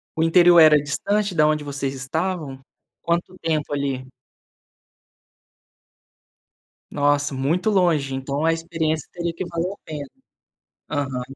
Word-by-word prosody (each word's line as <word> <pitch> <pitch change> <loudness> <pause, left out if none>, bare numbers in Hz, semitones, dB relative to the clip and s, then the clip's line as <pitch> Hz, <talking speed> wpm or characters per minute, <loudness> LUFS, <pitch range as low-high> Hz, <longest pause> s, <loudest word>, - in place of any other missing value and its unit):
O 160 - 0
interior 175 +1 +6
era 155 -1 +7
distante 200 +7 -1
da 155 -2 +4
onde 155 -1 0
vocês 140 -1 -3
estavam? 150 0 -3 0.4
Quanto 170 +2 -1
tempo 155 -3 -2
ali? 135 -2 -2 2.8
Nossa, 145 -1 +1
muito 165 +10 0
longe. 160 -9 +1
Então 140 +3 -3
a 165 - +3
experiência 165 -2 -2
teria 170 -1 -3
que 185 - -4
valer 170 +2 -3
a - - -10
pena. 145 -3 -7 0.8
Aham. 135 -4 -2
155 Hz, 120 wpm, -22 LUFS, 140-170 Hz, 2.8 s, era